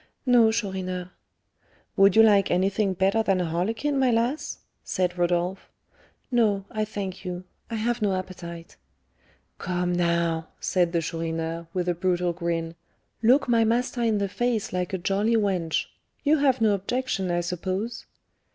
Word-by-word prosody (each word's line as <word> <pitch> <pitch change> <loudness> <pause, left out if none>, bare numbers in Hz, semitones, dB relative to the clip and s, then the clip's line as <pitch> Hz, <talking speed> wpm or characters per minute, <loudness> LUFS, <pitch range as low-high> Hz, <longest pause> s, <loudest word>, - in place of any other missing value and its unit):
"No, 240 -3 +5
Chourineur." 185 -4 -3 0.8
"Would 195 -1 +5
you 225 - +8
like 205 -3 +5
anything 190 +2 +1
better 195 +4 +2
than 195 -4 +1
a 180 - 0
harlequin, 220 - -1
my 260 -1 +3
lass?" 240 +6 0 0.3
said 180 -1 -1
Rodolph. 175 +1 -1 0.6
"No, 210 -5 +2
I 215 -1 -1
thank 195 -3 -5
you; 180 0 -5 0.3
I 230 - -3
have 235 +2 -1
no 200 -2 +2
appetite." 170 -2 -7 0.8
"Come, 180 -1 -1
now," 170 -2 0
said 175 -2 +1
the 170 -1 +1
Chourineur, 165 0 -3
with 180 0 -2
a 175 - +2
brutal 180 0 0
grin, 165 -1 -2 0.5
"look 250 +6 +4
my 230 -2 +4
master 240 +2 0
in 225 -2 +2
the 200 0 0
face 230 +1 -1
like 180 -1 -1
a 190 - -1
jolly 200 +5 +1
wench. 185 -6 0 0.4
You 305 +1 +3
have 265 -3 +2
no 215 -2 +4
objection, 200 -1 -2
I 175 0 +1
suppose?" 185 +6 -4
190 Hz, 150 wpm, -25 LUFS, 175-225 Hz, 0.8 s, you